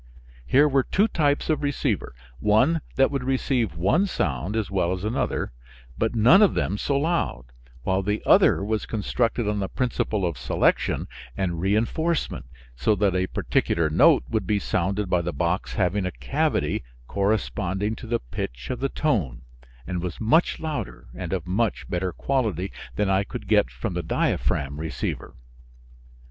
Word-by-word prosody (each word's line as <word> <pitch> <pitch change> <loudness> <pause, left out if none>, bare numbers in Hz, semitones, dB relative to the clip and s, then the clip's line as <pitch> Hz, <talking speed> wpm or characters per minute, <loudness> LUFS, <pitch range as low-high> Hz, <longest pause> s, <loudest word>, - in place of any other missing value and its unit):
Here 145 +3 +5
were 140 -2 +3
two 200 - +2
types 145 -7 +1
of 155 - +1
receiver, 145 - -1 0.2
one 125 +11 +3
that 135 +1 +4
would 135 -3 -2
receive 125 - 0
one 130 - +2
sound 75 - -2
as 110 -3 -1
well 90 -2 +1
as 95 0 -5
another, 110 - -1 0.4
but 115 +1 -1
none 120 - +6
of 210 - +5
them 100 - -1
so 140 - 0
loud, 155 - 0 0.4
while 95 +5 +1
the 105 +2 -2
other - - +5
was 110 +1 -2
constructed 115 +1 -1
on 105 0 0
the 95 -1 -2
principle 110 -5 -1
of 85 -4 -3
selection - - +1 0.3
and 90 -3 -1
re 95 +2 +2
enforcement, 160 - -1 0.3
so 105 - +2
that 100 -2 +1
a 90 0 +1
particular 85 -3 0
note 75 - +5
would 105 -4 -2
be 105 - +2
sounded 100 +1 -1
by 90 -1 +2
the 85 +1 -2
box 90 +2 -1
having 95 0 +1
a - - -3
cavity 65 +1 -1 0.2
corresponding 100 - -1
to 120 - -9
the 115 +1 0
pitch - - -5
of 125 - -3
the 135 - 0
tone, 80 - -1 0.4
and 90 +2 -3
was 90 -1 -5
much 155 +10 +2
louder 145 - -5
and 85 +7 -6
of 90 -3 -2
much 105 +5 -1
better 90 +1 -1
quality 105 - -1 0.2
than 105 - +1
I 95 +1 +2
could - - -8
get - - +3
from - - -4
the - - -2
diaphragm 70 +3 -1
receiver. 80 -4 -4
105 Hz, 165 wpm, -25 LUFS, 90-125 Hz, 0.4 s, none